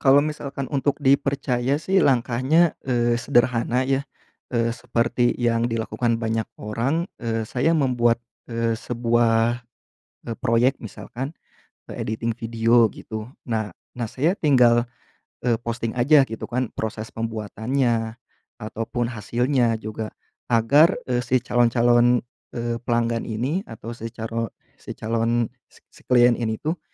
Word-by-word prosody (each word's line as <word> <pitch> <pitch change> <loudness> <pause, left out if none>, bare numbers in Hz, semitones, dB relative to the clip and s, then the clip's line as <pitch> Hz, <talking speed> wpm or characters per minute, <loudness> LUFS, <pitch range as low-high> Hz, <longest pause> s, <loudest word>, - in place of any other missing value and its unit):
Kalau 140 +1 +6
misalkan 140 -2 -4
untuk 145 0 0
dipercaya 140 -1 +1
sih 190 +3 +2
langkahnya, 130 +6 +3
eee, 120 -2 +1
sederhana 120 +1 +2
ya, 135 0 +1 0.5
eee, 115 -1 +1
seperti 120 0 +1
yang 115 -1 +2
dilakukan 115 +1 -1
banyak 110 0 0 0.2
orang, 130 - -1
eee, 115 -2 -3
saya 135 +7 +1
membuat, 120 -6 +2 0.3
eee, 115 -1 0
sebuah, 120 0 +1 0.6
eee, 115 - -3
proyek 120 +4 +3
misalkan, 130 +6 -6 0.6
eee, - - -6
editing 115 +2 -2
video 115 0 +3
gitu. 110 +1 -7 0.2
Nah 110 -5 -2 0.2
nah, 120 -2 -3
saya 155 +10 +1
tinggal, 120 -5 +4 0.6
eee, 115 -2 +2
posting 115 -1 -3
aja 135 +4 +5
gitu 115 -3 -6
kan, 125 -1 -1
proses 110 0 -4
pembuatannya, 115 +1 -1 0.4
ataupun 115 +1 -3
hasilnya 120 +2 +1
juga, 110 0 -5 0.4
agar, 140 +9 +5
eee, 125 -1 0
si 125 +1 +2
calon-calon, 120 0 +3 0.3
eee, 120 0 -2
pelanggan 115 -1 0
ini, 130 - -1
atau 115 0 -8
si 115 0 -6
caro 115 0 -4 0.3
si - - -8
calon 115 +1 0 0.2
si - - -22
si - - -18
klien 120 -1 +6
ini 110 -2 -1
tuh, 160 +2 -3
120 Hz, 130 wpm, -23 LUFS, 115-130 Hz, 0.6 s, Kalau